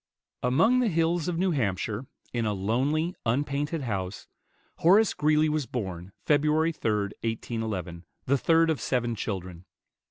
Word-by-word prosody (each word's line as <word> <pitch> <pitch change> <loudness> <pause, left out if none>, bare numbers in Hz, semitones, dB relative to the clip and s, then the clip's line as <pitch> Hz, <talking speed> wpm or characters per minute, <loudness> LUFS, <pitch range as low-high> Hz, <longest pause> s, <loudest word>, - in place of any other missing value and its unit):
Among 165 - +3
the 250 - +2
hills 165 -2 +1
of 175 -2 -1
New 185 +1 +2
Hampshire, 110 - -1 0.3
in 120 -1 0
a 105 - 0
lonely, 135 - 0
unpainted 145 +5 -1
house, 100 -5 -4 0.5
Horace 200 +6 +5
Greeley 155 +1 +3
was 150 -3 -1
born, 95 -6 -5
Feb. 145 -2 +4
3, 155 - +2
1811, 110 - -2 0.2
the 140 - +3
third 165 +4 +3
of 145 -8 -2
seven 120 -1 0
children. 95 -5 -5
130 Hz, 135 wpm, -27 LUFS, 105-160 Hz, 0.5 s, Horace